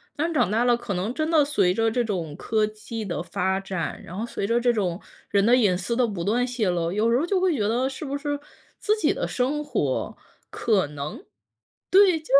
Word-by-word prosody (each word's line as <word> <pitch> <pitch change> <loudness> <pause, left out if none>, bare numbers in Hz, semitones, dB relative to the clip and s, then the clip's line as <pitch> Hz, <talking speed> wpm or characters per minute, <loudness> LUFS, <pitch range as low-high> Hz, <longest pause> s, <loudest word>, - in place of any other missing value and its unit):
但 325 +3 -1
长 245 - +2
大 225 +3 +2
了， 240 -1 +4
可 240 -4 -4
能 185 +5 -2
真 310 +3 -1
的 315 -3 +5
随 280 -11 +2
着 225 +3 +2
这 240 +2 0
种 175 -9 -3
科 215 +5 0
技 215 +1 -7
的 170 -5 -3
发 190 +2 -1
展， 190 -3 -4
然 175 - -9
后 210 - -3
随 220 - -4
着 230 +3 +2
这 240 0 +3
种 195 -5 -1 0.3
人 200 -1 +3
的 235 +4 +5
隐 210 -7 +3
私 180 +6 -2
的 250 0 +3
不 200 -7 -4
断 235 +6 +1
泄 240 -5 -1
露。 170 -1 0
有 215 +4 +1
时 235 - +3
候 295 - +1
就 375 +2 +1
会 365 -4 +2
觉 210 -6 0
得， 245 +4 +1
是 275 +3 -7
不 280 0 -3
是 290 0 -3 0.4
自 425 - +1
己 - - +2
的 - - -2
生 275 +4 -1
活， - - -1 0.4
可 205 -6 +1
能 145 0 -7 0.7
对， 380 -3 +6
就 315 - -20
225 Hz, 245 characters per minute, -25 LUFS, 190-270 Hz, 0.7 s, 对